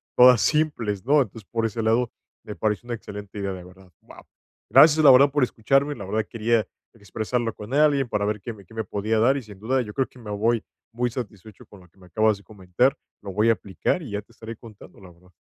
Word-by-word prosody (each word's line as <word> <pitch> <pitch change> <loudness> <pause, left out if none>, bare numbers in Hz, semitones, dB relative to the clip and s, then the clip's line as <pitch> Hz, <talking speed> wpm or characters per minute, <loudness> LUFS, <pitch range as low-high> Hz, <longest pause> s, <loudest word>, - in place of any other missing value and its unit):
todas 125 -2 +7
simples, 120 -11 0
¿no? 145 +2 +4
Entonces, 110 -4 -6
por 115 -1 -1
ese 115 +1 -2
lado, 115 +2 +1 0.3
me 105 - -8
parece 110 +2 -2
una 120 - -3
excelente 105 -2 -10
idea, 100 -1 -2
de 90 -1 -9
verdad. 90 +1 -17
Wao. - - -16 0.4
Gracias, 155 0 +6
la 135 - +10
verdad, 140 +2 +6
por 145 -1 +1
escucharme, 135 +5 +1
la 100 - -8
verdad 105 +3 -1
quería 115 -2 0 0.3
expresarlo 115 +2 -3
con 105 +5 -9
alguien 145 -4 +3
para 105 -1 -1
ver 105 -1 -2
qué 120 - -6
me 100 -3 -16
qué 110 - -18
me 110 - -3
podía 105 +3 -1
dar. 130 +5 +3
Y, 135 - -6
sin 105 -3 -14
duda, 130 +5 0
yo 105 -4 -7
creo 135 +2 0
que 130 - -19
me 110 -3 -8
voy 110 +2 0 0.3
muy 120 +1 -1
satisfecho 110 -4 -9
con 100 - -16
lo 90 - -19
que 85 - -33
me 90 - -17
acabas 110 +4 +2
de 100 - -18
comentar, 105 +7 0 0.2
lo 100 - -7
voy 105 +4 +1
a - - +6
aplicar 100 - -2
y 135 -10 -8
ya 105 - -3
te 110 +3 -25
estaré 115 -1 -9
contando, 110 -4 -15
la 95 -2 -14
verdad. 90 +1 -22
110 Hz, 240 wpm, -24 LUFS, 100-125 Hz, 0.4 s, la